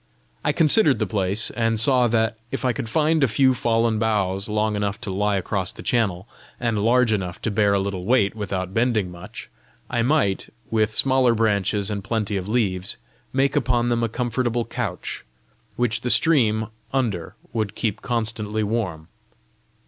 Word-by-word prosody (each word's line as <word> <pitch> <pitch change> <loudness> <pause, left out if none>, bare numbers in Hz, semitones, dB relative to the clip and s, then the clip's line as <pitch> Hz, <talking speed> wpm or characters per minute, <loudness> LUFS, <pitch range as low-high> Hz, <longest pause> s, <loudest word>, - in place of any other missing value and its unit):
I - - +2
considered 155 -2 +4
the 110 - 0
place, 100 +2 +1
and 115 -2 0
saw 125 +1 +4
that, 110 -1 +1
if 135 +1 -4
I 125 - +2
could 115 - -5
find 155 +3 +2
a - - +5
few 130 +4 +3
fallen 115 -2 +1
boughs 100 -3 0
long 105 0 0
enough 105 0 -2
to 100 - -4
lie 100 +1 +1
across 95 0 -2
the - - -11
channel, 100 -5 0 0.3
and 115 -4 0
large 120 0 +3
enough 95 -3 -3
to 110 - 0
bear 100 -1 +2
a - - +2
little 95 -2 -3
weight 105 -3 +3
without 95 -3 -4
bending 115 -5 +1
much, 85 0 -9 0.4
I 120 -1 +1
might, 115 -7 +1 0.2
with 110 -1 +2
smaller 130 0 +3
branches 105 -2 +1
and 100 -1 -3
plenty 110 -2 -2
of 95 +1 -3
leaves, 95 -6 0 0.3
make 135 +1 +1
upon 120 -4 +1
them 120 -1 +1
a 115 - 0
comfortable 120 0 -1
couch, 115 -6 -4 0.5
which 115 -1 0
the 125 - -2
stream 110 -9 +3 0.2
under 110 -11 -2 0.2
would 110 -3 -2
keep 110 -2 -2
constantly 110 -3 -1
warm. 100 -8 -2
110 Hz, 170 wpm, -23 LUFS, 100-120 Hz, 0.5 s, a